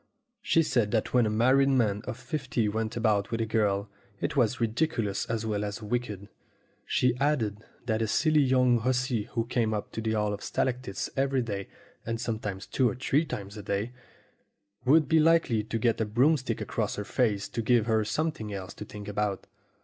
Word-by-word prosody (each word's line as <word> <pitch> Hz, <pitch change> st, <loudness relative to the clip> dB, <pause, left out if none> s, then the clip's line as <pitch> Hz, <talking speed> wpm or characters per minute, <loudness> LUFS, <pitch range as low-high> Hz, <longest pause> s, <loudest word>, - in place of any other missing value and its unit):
She 165 Hz, -5 st, +3 dB
said 120 Hz, -8 st, +1 dB
that 110 Hz, -, 0 dB
when 125 Hz, -3 st, +4 dB
a -, -, +1 dB
married 130 Hz, +5 st, +4 dB
man 110 Hz, -6 st, +2 dB
of 130 Hz, -2 st, -5 dB
fifty 130 Hz, -3 st, -2 dB
went 110 Hz, +2 st, -2 dB
about 105 Hz, -3 st, +1 dB
with 115 Hz, -, -2 dB
a 115 Hz, -, +1 dB
girl, 105 Hz, -2 st, +1 dB, 0.3 s
it -, -, -2 dB
was 125 Hz, -2 st, +2 dB
ridiculous 115 Hz, -3 st, 0 dB
as 115 Hz, -1 st, -2 dB
well 105 Hz, -2 st, -1 dB
as 105 Hz, +2 st, -5 dB
wicked. 105 Hz, -3 st, -3 dB, 0.6 s
She 125 Hz, -1 st, +2 dB
added 125 Hz, -8 st, +1 dB, 0.3 s
that 110 Hz, -2 st, 0 dB
a 110 Hz, -, +1 dB
silly 155 Hz, +7 st, +3 dB
young 125 Hz, -2 st, +4 dB
hussy 125 Hz, -2 st, 0 dB
who 115 Hz, -1 st, 0 dB
came 115 Hz, -3 st, 0 dB
up 105 Hz, -, -5 dB
to 110 Hz, -, -4 dB
the 110 Hz, 0 st, -1 dB
Hall 105 Hz, -1 st, 0 dB
of 100 Hz, -, -6 dB
Stalactites 125 Hz, -6 st, -2 dB
every 135 Hz, -1 st, +1 dB
day, 100 Hz, -4 st, -4 dB, 0.4 s
and 115 Hz, 0 st, -3 dB
sometimes 110 Hz, -5 st, -3 dB
two 130 Hz, -3 st, +1 dB
or -, -, -4 dB
three 140 Hz, +5 st, +1 dB
times 100 Hz, -6 st, -6 dB
a -, -, -6 dB
day, 100 Hz, +4 st, -2 dB, 0.9 s
would 150 Hz, +3 st, +5 dB
be 160 Hz, +2 st, +4 dB
likely 160 Hz, -8 st, +3 dB
to 110 Hz, -, -2 dB
get 115 Hz, 0 st, +1 dB
a -, -, +2 dB
broomstick 130 Hz, +6 st, +1 dB
across -, -, -2 dB
her 105 Hz, -, -4 dB
face 105 Hz, -6 st, 0 dB
to 115 Hz, -, -3 dB
give 115 Hz, 0 st, +3 dB
her 110 Hz, -2 st, +2 dB
something 115 Hz, -2 st, -2 dB
else 95 Hz, -2 st, -6 dB
to 105 Hz, -, -8 dB
think 105 Hz, -1 st, -9 dB
about. 105 Hz, -1 st, -2 dB
115 Hz, 195 wpm, -28 LUFS, 105-130 Hz, 0.9 s, would